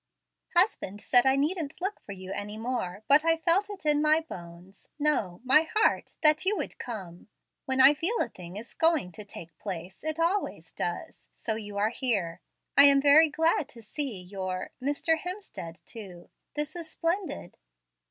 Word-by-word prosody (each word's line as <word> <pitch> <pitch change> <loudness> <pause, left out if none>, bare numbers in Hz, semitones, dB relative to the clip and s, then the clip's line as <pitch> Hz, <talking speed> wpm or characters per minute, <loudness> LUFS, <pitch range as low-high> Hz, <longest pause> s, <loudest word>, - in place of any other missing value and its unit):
"Husband 345 - +2
said 245 +4 +4
I 265 - +5
needn't 300 +1 -1
look 390 +3 -2
for - - -11
you 190 -1 -8
any 210 +1 -5
more, 220 -5 -3
but 285 +2 +6
I 330 0 +3
felt 355 +5 +2
it 395 -6 -8
in 295 -1 +3
my 310 +1 +4
bones 175 - -11
no, 285 -13 0
my 305 +5 +4
heart 430 - +2
that 305 +1 +5
you 400 +2 +2
would - - -5
come. 190 -8 -7 0.4
When 265 0 -1
I 265 +2 +8
feel 340 +10 0
a - - +1
thing 180 0 -11
is 225 +2 -9
going 320 - +2
to 210 - -9
take 165 -5 -10
place 185 0 -6
it 315 +1 -2
always 355 +5 -1
does. - - -5
So 220 - -3
you 205 -2 -6
are 210 +2 +2
here. 215 -9 -1 0.3
I 280 - +9
am 280 -1 +7
very 295 +3 +6
glad 320 -1 +1
to 235 -4 -13
see 255 -2 -4
your 185 0 -5
Mr. 290 +4 +1
Hemstead 360 - -7
too. 190 -6 -10 0.2
This 300 +1 -3
is 335 -2 -6
splendid." 340 - -3
270 Hz, 175 wpm, -28 LUFS, 195-320 Hz, 0.4 s, I